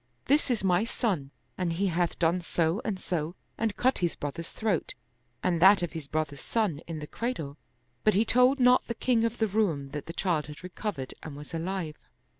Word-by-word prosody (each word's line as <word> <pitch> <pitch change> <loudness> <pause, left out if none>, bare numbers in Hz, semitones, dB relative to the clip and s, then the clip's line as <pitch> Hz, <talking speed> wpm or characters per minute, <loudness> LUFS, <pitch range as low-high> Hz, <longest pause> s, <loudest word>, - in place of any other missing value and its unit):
This 285 +1 +3
is 235 -5 +1
my 185 +1 +3
son 200 - -1 0.3
and 175 -2 0
He 190 +4 0
hath 175 -2 0
done 170 +2 +2
so 170 +3 0
and 195 -4 -2
so 170 -1 -2 0.2
and 220 -2 -1
cut 260 +1 +2
his 175 -3 0
brother's 145 +4 -5
throat 215 -7 -1 0.5
and 175 -3 +1
that 190 0 +7
of 175 - -2
his 160 -4 -6
brother's 150 -2 -2
son 205 -10 0
in 165 -2 -4
the 150 - -5
cradle." 155 - -4 0.4
But 215 - +4
he 215 +3 +4
told 250 +4 +5
not 250 0 +5
the 235 - -3
king 230 -1 +2
of 230 +1 -1
the 220 - +2
Roum 180 -10 0
that 145 0 -6
the 165 - -5
child 170 -5 0
had 150 +3 -10
recovered 180 - -4
and 155 -3 -7
was 150 +2 -10
alive. 165 -2 -3
180 Hz, 205 wpm, -29 LUFS, 155-220 Hz, 0.5 s, that